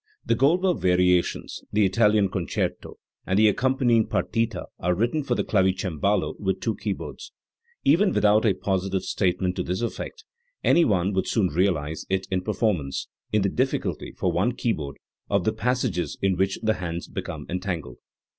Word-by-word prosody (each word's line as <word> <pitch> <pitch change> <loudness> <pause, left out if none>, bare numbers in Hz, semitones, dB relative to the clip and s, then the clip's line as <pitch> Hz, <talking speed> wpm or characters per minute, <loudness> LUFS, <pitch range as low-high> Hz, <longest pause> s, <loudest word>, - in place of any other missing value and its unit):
The - - +2
Goldberg 175 +6 +2
Variations, 90 -1 +1
the 105 0 +3
Italian 105 +1 +3
Concerto, 90 -3 -3 0.3
and 95 - +1
the 110 +1 +6
accompanying 120 0 +2
partita 115 -5 -1
are 90 +1 +1
written 120 - 0
for 130 -3 -1
the - - 0
clavicembalo 95 -1 0
with 95 -2 -1
two 110 +2 -1
keyboards, 100 -3 -5 0.5
Even 195 +3 +4
without 105 -4 +4
a 105 -5 +3
positive 95 0 -1
statement 90 -1 0
to - - 0
this 90 +5 -2
effect 445 - -5 0.4
any 170 - +5
one 95 -2 +1
would 95 - 0
soon 100 -6 +2
realise 80 -3 0
it 95 0 0
in 95 -1 +1
performance, 95 - -1 0.2
in 105 -2 +2
the 100 - +2
difficulty, 130 +7 -1
for - - +1
one 120 - +1
keyboard, 80 - -2 0.3
of 100 -2 +2
the 110 - +1
passages 120 -6 -1
in 95 -1 +1
which 95 +2 0
the 110 0 +3
hands 85 -1 -4
become - - -6
entangled. 90 -3 -4
100 Hz, 160 wpm, -25 LUFS, 90-115 Hz, 0.5 s, the